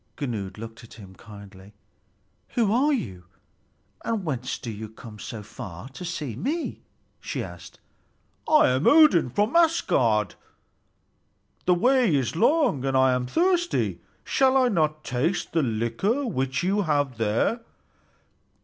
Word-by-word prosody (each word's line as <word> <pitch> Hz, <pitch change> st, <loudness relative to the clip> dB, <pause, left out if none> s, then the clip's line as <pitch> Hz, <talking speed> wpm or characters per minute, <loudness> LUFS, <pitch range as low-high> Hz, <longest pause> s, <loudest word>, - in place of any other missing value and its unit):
Gunnlöd 110 Hz, -9 st, -4 dB
looked 115 Hz, +1 st, -9 dB
at 115 Hz, -, -14 dB
him 100 Hz, -4 st, -13 dB
kindly. 100 Hz, -1 st, -14 dB, 0.8 s
"Who 220 Hz, -4 st, +2 dB
are 275 Hz, +6 st, +3 dB
you, 95 Hz, -, -3 dB, 0.8 s
and 220 Hz, -5 st, -2 dB
whence 130 Hz, -5 st, -3 dB
do 115 Hz, -, -6 dB
you 110 Hz, 0 st, -7 dB
come 110 Hz, -1 st, -12 dB
so 110 Hz, -1 st, -7 dB
far 100 Hz, 0 st, -9 dB
to 140 Hz, +7 st, -10 dB
see 155 Hz, -9 st, -4 dB
me?" 305 Hz, -, -3 dB, 0.4 s
she -, -, -4 dB
asked. -, -, -11 dB, 0.7 s
"I 310 Hz, -, +6 dB
am 130 Hz, +3 st, +1 dB
Odin, 295 Hz, -, +6 dB
from 210 Hz, -, 0 dB
Asgard. 120 Hz, -, +2 dB, 1.3 s
The 180 Hz, -, +4 dB
way 245 Hz, -, +3 dB
is 135 Hz, +1 st, -1 dB
long 240 Hz, -, +2 dB
and 135 Hz, -1 st, +1 dB
I 130 Hz, -1 st, +4 dB
am 125 Hz, 0 st, -1 dB
thirsty. 345 Hz, -, 0 dB, 0.2 s
Shall 265 Hz, 0 st, +3 dB
I 255 Hz, -2 st, +4 dB
not 155 Hz, -6 st, 0 dB
taste 150 Hz, +9 st, -2 dB
the 165 Hz, -, +2 dB
liquor 120 Hz, -, -1 dB
which 135 Hz, -, -2 dB
you 195 Hz, +3 st, +1 dB
have 145 Hz, -, 0 dB
there?" 115 Hz, -, +1 dB
140 Hz, 140 wpm, -25 LUFS, -, 1.3 s, I